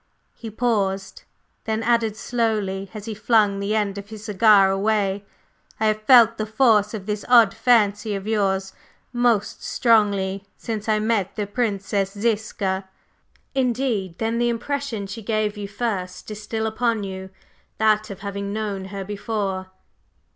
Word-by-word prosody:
He 230 - -8
paused, 200 -4 -1 0.4
then 220 0 -1
added 230 -2 +2
slowly 210 -5 -1
as 210 -1 -7
he 225 - -4
flung 210 -2 +2
the 200 +2 -1
end 205 -2 -1
of 200 +1 -11
his 215 -1 -9
cigar 205 -2 +5
away: 200 0 0 0.6
"I 220 - +1
have 215 0 +1
felt 230 -1 +6
the 215 - -2
force 215 -2 +3
of 200 -3 -7
this 210 -1 -3
odd 230 -5 +7
fancy 215 -3 +2
of 195 0 -5
yours 195 -3 0 0.4
most 240 -4 +1
strongly 200 -4 +2
since 220 -1 -4
I 215 - +3
met 215 -3 0
the 210 - -2
Princess 200 -3 -1
Ziska." 205 -4 -1 0.6
"Indeed! 240 -8 -1
Then 225 +1 -1
the 240 0 +2
impression 240 -2 -3
she 200 +4 -7
gave 215 -1 -1
you 205 -1 -5
first 200 -3 -4
is 210 0 -7
still 220 +1 -3
upon 225 -1 0
you 190 -1 -6 0.5
that 215 -1 +2
of 195 -2 -8
having 200 0 -4
known 205 -3 -3
her 195 0 -6
before?" 200 -2 -3
210 Hz, 150 wpm, -23 LUFS, 200-225 Hz, 0.6 s, odd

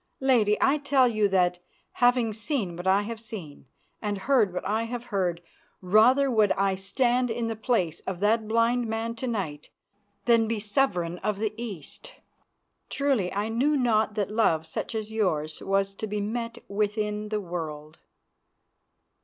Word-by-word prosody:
Lady, 230 -6 +3
I 290 +2 +3
tell 280 -3 +3
you 215 -3 +2
that, 180 -2 +2 0.3
having 245 -2 +2
seen 215 - -2
what 175 +2 -5
I 195 +2 +4
have 225 +1 -6
seen 195 - -9 0.3
and 205 -2 -2
heard 220 -1 +2
what 180 - -5
I 220 +3 0
have 240 +1 -5
heard, 175 -3 0 0.4
rather 245 +9 +4
would 215 -3 +3
I 195 0 +1
stand 240 +6 +1
in 230 +1 -2
the 225 0 -2
place 210 - 0
of 190 -2 -3
that 215 +2 +2
blind 230 +2 +2
man 225 +1 -2
to 255 - -3
night 170 -11 -4 0.6
than 230 -2 +4
be 225 -1 -1
Sovereign 200 -6 0
of 210 -2 -1
the 215 0 -2
East. 230 - -8 0.7
Truly, 270 -10 0
I 205 +2 -2
knew 275 +7 +2
not 220 -4 +2
that 205 -2 -1
love 165 -8 +2
such 195 +8 -5
as 220 0 -4
yours 160 -8 -1
was 195 0 0
to 215 +2 -5
be 210 0 -3
met 230 +3 -3
with 210 +1 -1
in 210 0 -2
the 215 0 -1
world. 155 -5 -6
215 Hz, 165 wpm, -27 LUFS, 195-235 Hz, 0.7 s, I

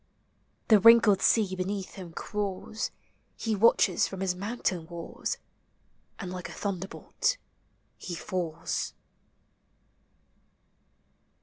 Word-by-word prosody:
The 215 -2 +8
wrinkled 230 -2 +7
sea 205 -5 +3
beneath 190 +1 -3
him 180 -3 -8
crawls; 210 +3 -3 0.5
He 225 -2 -1
watches 205 -3 +4
from 190 -1 -7
his 190 -2 +1
mountain 190 -4 -2
walls. 170 -1 -4 0.8
And 185 -3 -6
like 180 -1 -6
a - - -8
thunderbolt 200 - -2 0.6
he 175 - -5
falls. 170 -2 -3
190 Hz, 95 wpm, -29 LUFS, 180-210 Hz, 0.8 s, The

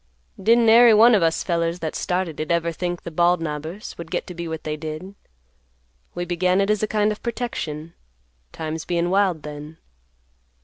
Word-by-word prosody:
"Didn't 230 +3 +4
ary 230 0 +7
one 230 +3 +7
of 205 - +4
us 165 -1 +1
fellers 170 -1 -1
that 160 -3 -4
started 180 -3 -2
it 155 - -3
ever 170 0 +1
think 175 +1 -4
the 170 - -6
Bald 175 +2 +3
Knobber's 160 +5 -6
would 170 -1 -7
get - - -2
to 180 - -8
be 170 0 -6
what 160 -1 -5
they 155 0 -3
did. 155 +5 -7 1.0
We 175 0 -3
began 180 +2 +1
it 200 +1 +2
as 210 - 0
a 215 - 0
kind 210 0 +1
of 210 - -6
protection, 170 -10 -4 0.6
times 160 0 -5
bein' 175 0 -1
wild 190 -5 +1
then. 150 +1 -8
175 Hz, 185 wpm, -22 LUFS, 160-200 Hz, 1.0 s, ary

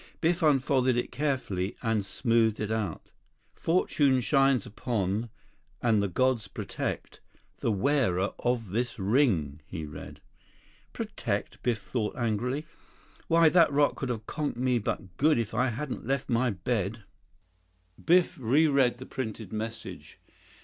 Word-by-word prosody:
Biff 170 +2 +1
unfolded 130 -4 +3
it 120 - -2
carefully 125 -9 -1
and 110 -2 +1
smoothed 110 +2 +1
it 105 0 -2
out. 105 -7 -3 0.4
"Fortune 145 -6 +2
shines 135 -2 +3
upon, 110 -1 -2 0.5
and 110 -4 +3
the 100 - +1
gods 125 +1 +1
protect, - - -5 0.4
the - - 0
wearer 100 -4 +1
of 120 -5 -1
this 120 +4 -1
ring," 95 - +1
he 80 -4 -5
read. 75 - -9 0.7
"'Protect!'" - - -3
Biff 120 -3 0
thought 110 -4 -2
angrily. 125 +5 -1 0.6
"Why, 165 0 +5
that 165 -3 +5
rock 145 0 +3
could 135 - -4
have 110 -3 -3
conked 150 -2 -3
me 125 -1 +2
but 95 -3 -4
good 155 0 +4
if 115 -2 -2
I 125 +3 +2
hadn't 130 0 -4
left 135 0 -1
my 120 +2 +2
bed." 105 +1 -2 1.0
Biff 175 -1 +3
reread 135 0 +3
the 130 - -9
printed 110 -6 -5
message. 110 +1 -6
120 Hz, 135 wpm, -28 LUFS, 105-135 Hz, 1.0 s, Why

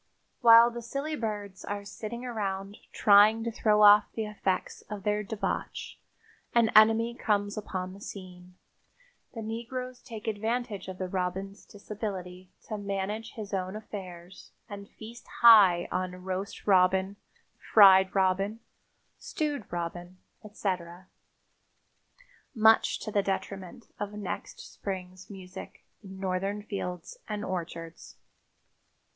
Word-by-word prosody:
While 230 0 +8
the 235 0 -6
silly 275 +6 -4
birds 205 -6 -5
are 205 0 -5
sitting 225 +4 -7
around 200 -4 -4
trying 210 +2 +5
to 235 - -2
throw 215 -2 +3
off 205 0 +8
the 220 - -2
effects 200 -3 -3
of 210 -2 -6
their 210 0 0
debauch 210 0 -4 0.6
an 230 -2 +4
enemy 225 +2 +5
comes 205 -3 -1
upon 185 -3 -5
the 200 - -13
scene. 180 -3 -10 0.8
The 225 - -5
negroes 245 +3 -6
take 225 -4 -9
advantage 220 0 -2
of 185 -1 -7
the 185 - -3
robin's 190 +2 -4
disability 190 -3 -7 0.2
to 215 - -4
manage 200 +3 -4
his 210 -2 -8
own 185 0 -2
affairs 185 -4 -9 0.2
and 200 -1 -9
feast 230 +2 -12 0.2
high 200 -7 +8
on 185 0 -3
roast 190 +1 -5
robin, 190 0 +3 0.4
fried 190 -2 +6
robin, 195 +3 +1 0.6
stewed 290 -8 -4
robin, 175 +1 -5 0.3
etc., 185 -4 -5 1.5
much 220 0 +4
to 215 - -5
the 205 - +2
detriment 195 +1 -5
of 205 0 -4
next 210 -3 -6
spring's 185 -1 -7
music 190 -2 -10 0.2
in 190 -1 -10
Northern 195 +2 -2
fields 195 - -6
and 210 0 -3
orchards. 165 -2 -6
200 Hz, 120 wpm, -28 LUFS, 185-220 Hz, 1.5 s, While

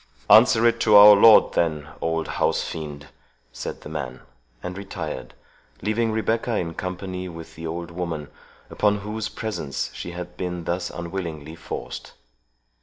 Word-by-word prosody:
"Answer 115 +1 +7
it 115 0 +3
to 110 -2 +4
our 105 0 +11
lord, 110 +2 +7
then, 75 -3 0
old 80 -1 -1
housefiend," 75 -2 -2 0.4
said - - -6
the - - -9
man, 65 -5 -5 0.4
and 90 0 -5
retired; 95 -5 -6 0.5
leaving 110 +1 0
Rebecca 115 +1 0
in 85 -2 -3
company 90 +1 -5
with 85 -1 -10
the 80 0 -7
old 85 +1 -5
woman, 85 -4 -4 0.4
upon 105 -1 +1
whose 105 +1 -4
presence 105 -11 -4
she - - -6
had 90 0 -7
been 90 -2 -4
thus 85 +2 -2
unwillingly 85 -3 -6
forced. 80 - -7
90 Hz, 140 wpm, -24 LUFS, 80-105 Hz, 0.5 s, our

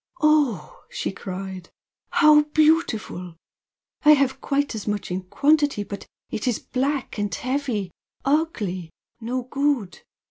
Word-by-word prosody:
"Oh!" 295 - +2
she - - -3
cried 190 -2 -7 0.4
"How 305 -1 +6
beautiful! 240 - +2 0.7
I 300 0 +9
have 275 -2 +1
quite 285 0 0
as 220 -2 -6
much 205 -3 -2
in 185 +1 -1
quantity, 290 +4 +2
but 200 0 -8 0.2
it 215 - -3
is 240 - +2
black 270 -2 -2
and 205 -1 -1
heavy 255 -8 -2 0.3
ugly! 225 - 0 0.3
no 245 +2 -3
good. 275 -6 -1
250 Hz, 120 wpm, -24 LUFS, 195-290 Hz, 0.7 s, I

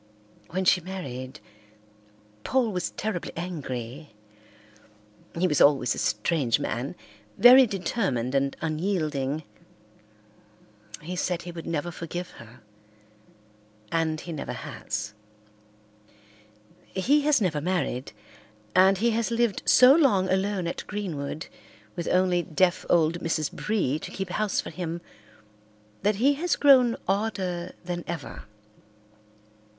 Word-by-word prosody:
When 185 +2 -2
she 180 0 +4
married, 145 -7 -7 1.0
Paul 255 -4 +1
was 180 -2 -2
terribly 210 -5 -4
angry. 140 -6 -6 1.2
He 180 - +2
was 150 -4 +1
always 135 -5 +4
a - - -5
strange 120 +3 +1
man, 125 +8 -3 0.4
very 255 +2 +8
determined 180 - -2
and 135 0 0
unyielding. 155 -4 -1 1.6
He 180 +3 -5
said 180 -1 -1
he 175 - -7
would 165 -1 -8
never 165 +1 -2
forgive 175 +1 -6
her, 115 0 -15 1.3
and 160 -1 0
he 170 - -8
never 145 - -5
has. 105 0 -5 1.7
He 275 +11 +2
has 290 -2 +3
never 165 -8 0
married, 165 -7 -2 0.6
and 190 +1 +6
he 235 +4 +2
has 230 +1 0
lived 235 -3 0
so 255 +1 +8
long 255 - +3
alone 190 -1 0
at 170 - -4
Greenwood 170 -6 -4 0.5
with 170 -2 -4
only 180 -1 +2
deaf 180 +2 +1
old 165 0 +3
Mrs. 165 -3 -1
Bree 185 -10 -1
to - - -7
keep 190 -1 -5
house 215 +2 0
for - - -8
him 170 -2 -4 1.0
that 210 +2 +2
he 265 +8 +3
has 355 -1 +1
grown 255 -5 +5
odder 190 -3 -2
than 175 -1 -4
ever. 170 -4 -6
175 Hz, 120 wpm, -26 LUFS, 155-200 Hz, 1.7 s, very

